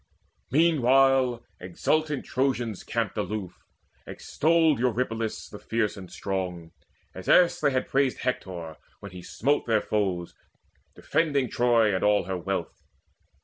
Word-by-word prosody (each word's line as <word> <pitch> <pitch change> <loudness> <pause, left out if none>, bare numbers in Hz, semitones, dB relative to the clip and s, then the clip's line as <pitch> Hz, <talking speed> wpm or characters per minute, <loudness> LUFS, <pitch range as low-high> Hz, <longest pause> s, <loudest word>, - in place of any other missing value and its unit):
Meanwhile 135 -5 +3
exultant 150 - -1
Trojans 125 -6 -1
camped - - -2
aloof 100 -4 -4 0.5
Extolled 160 -3 +1
Eurypylus 115 -2 -2
the 105 - -11
fierce 115 -2 -1
and 95 -2 -11
strong, 90 -4 -4 0.4
As 95 - -7
erst 180 -1 +5
they - - +3
had 130 -1 -1
praised 135 -1 0
Hector, 90 - -4 0.2
when 100 - -10
he 90 -1 -9
smote 140 +11 -1
Their 110 -2 +3
foes, 95 -5 -2 0.6
defending 140 -6 0
Troy 115 -3 +3
and 95 - -1
all 105 0 +3
her 95 +1 -4
wealth. 95 +3 -4
115 Hz, 125 wpm, -26 LUFS, 95-135 Hz, 0.6 s, erst